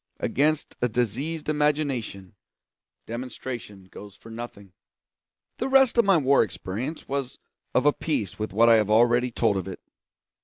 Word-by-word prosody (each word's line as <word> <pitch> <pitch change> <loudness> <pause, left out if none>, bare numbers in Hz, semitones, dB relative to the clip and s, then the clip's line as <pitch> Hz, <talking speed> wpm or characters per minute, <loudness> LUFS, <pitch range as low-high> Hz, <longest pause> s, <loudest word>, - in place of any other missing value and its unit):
Against 150 +2 0
a 125 - +2
diseased 125 +8 -2
imagination, 145 -10 -1 0.7
demonstration 120 -4 -7
goes 100 +2 -12
for 115 +3 -14
nothing. 110 -5 -9 0.9
The 260 - -1
rest 265 -2 +5
of 235 - +4
my 195 -3 +5
war 140 -2 +4
experience 110 - -4
was 140 -2 -3 0.4
of - - +3
a 145 - +5
piece 110 - -3
with 110 - -3
what 115 +4 +4
I 115 -1 +7
have 105 -1 +1
already 120 +3 +4
told 110 -4 +1
of 95 - -4
it. 95 - -7
120 Hz, 150 wpm, -25 LUFS, 105-145 Hz, 0.9 s, I